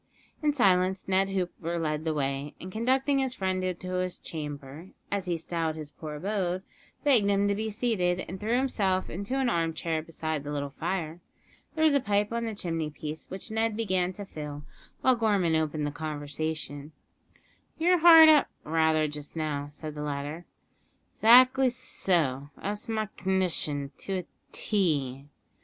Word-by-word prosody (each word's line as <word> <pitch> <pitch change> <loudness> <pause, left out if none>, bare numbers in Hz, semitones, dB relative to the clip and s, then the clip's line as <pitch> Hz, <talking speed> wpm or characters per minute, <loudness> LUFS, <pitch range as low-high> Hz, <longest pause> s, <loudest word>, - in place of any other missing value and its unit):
In 300 -1 +3
silence 190 -7 +2
Ned 190 +1 +2
Hooper 175 -3 -2
led 155 -1 -2
the 160 - +1
way, 140 0 -2
and, 185 - -8
conducting 265 +6 +1
his 260 -1 -1
friend 185 -1 -1
into 185 0 -3
his 185 -1 -3
"chamber," 145 +1 -7 0.2
as 200 -2 -1
he 175 -2 -1
styled 165 -1 -2
his 155 -2 -7
poor 150 0 -7
abode, 185 +1 -2 0.4
begged 245 -9 +4
him 200 0 +3
to 200 - +2
be 220 +2 -2
seated, 205 -6 0
and 185 +3 -6
threw 225 +3 +1
himself 200 -8 0
into 200 +9 -3
an 265 -2 +1
armchair 165 -4 0
beside 155 -2 -4
the 145 - -5
little 140 -1 -3
fire. 165 +1 -3 0.6
There 315 - +1
was 310 - +5
a 280 - +4
pipe 210 -3 0
on 235 0 -1
the 220 -2 -4
chimney 165 -5 -2
piece, 150 +1 -7
which 190 +4 -7
Ned 220 -1 0
began 185 -5 0
to 205 +2 -7
fill, 150 -4 -7 0.4
while 260 -1 +4
Gorman 205 -7 +2
opened 155 -1 0
the 145 - -2
conversation. 150 0 -5 0.8
"You're 355 +2 +3
hard 325 -1 +10
up, 305 -2 +6 0.2
rather, 160 0 +2
just 150 +1 -7
now?" 150 -3 -2
said 150 +1 -8
the 150 - -6
latter. 145 +3 -4 0.7
"'Xactly 255 +3 +6
so, 150 - -1
that's 205 +3 -4
my 220 -1 0
c'ndition 175 -7 0
to 195 - -5
a - - -19 0.3
tee." 145 - -1
180 Hz, 165 wpm, -28 LUFS, 155-210 Hz, 0.8 s, hard